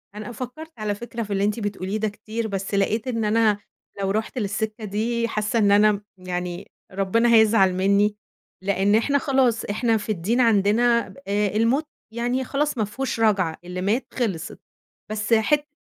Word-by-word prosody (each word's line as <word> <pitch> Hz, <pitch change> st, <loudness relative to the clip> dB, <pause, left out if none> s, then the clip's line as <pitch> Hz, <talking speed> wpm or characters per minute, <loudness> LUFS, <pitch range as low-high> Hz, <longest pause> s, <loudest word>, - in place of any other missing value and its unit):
أنا 215 Hz, +3 st, -6 dB
فكرت 255 Hz, +7 st, -7 dB
على 210 Hz, -2 st, -2 dB
فكرة 235 Hz, +1 st, -5 dB
في 205 Hz, -1 st, -4 dB
اللي 195 Hz, 0 st, 0 dB
أنتِ 210 Hz, +2 st, 0 dB
بتقوليه 205 Hz, -1 st, -3 dB
ده 215 Hz, 0 st, 0 dB
كتير، 220 Hz, +2 st, -5 dB
بس 195 Hz, 0 st, -4 dB
لقيت 215 Hz, +5 st, +1 dB
إن 230 Hz, -3 st, -1 dB
أنا 215 Hz, -1 st, +3 dB, 0.4 s
لو 195 Hz, 0 st, 0 dB
رُحت 220 Hz, +4 st, -2 dB
للسكة 215 Hz, +1 st, -2 dB
دي، 230 Hz, +3 st, -1 dB
حاسّه 215 Hz, +1 st, -1 dB
إن 200 Hz, -1 st, +4 dB
أنا 210 Hz, +1 st, +6 dB
م 205 Hz, -, -3 dB, 0.2 s
يعني 180 Hz, 0 st, -5 dB, 0.2 s
ربنا 225 Hz, +5 st, +2 dB
هيزعل 220 Hz, -4 st, +5 dB
مني، 200 Hz, +2 st, +2 dB, 0.5 s
لأن 200 Hz, +1 st, +2 dB
إحنا 280 Hz, +6 st, +2 dB
خلاص. 260 Hz, -5 st, +1 dB
إحنا 225 Hz, +2 st, +1 dB
في 215 Hz, +1 st, -3 dB
الدين 215 Hz, +7 st, 0 dB
عندنا 230 Hz, +2 st, +3 dB
ب -, -, -15 dB
آآ 205 Hz, +1 st, +1 dB
الموت 245 Hz, +8 st, +2 dB, 0.3 s
يعني 245 Hz, +3 st, -1 dB
خلاص 290 Hz, +2 st, -1 dB
ما 215 Hz, -, +1 dB
فيهوش 245 Hz, +2 st, -4 dB
رجعة، 195 Hz, -7 st, +2 dB
اللي 180 Hz, +1 st, -5 dB
مات 220 Hz, +7 st, 0 dB
خِلصت. 195 Hz, -11 st, -3 dB, 0.5 s
بس 215 Hz, +2 st, +1 dB
حت 295 Hz, +7 st, +2 dB
215 Hz, 175 wpm, -23 LUFS, 200-235 Hz, 0.5 s, أنا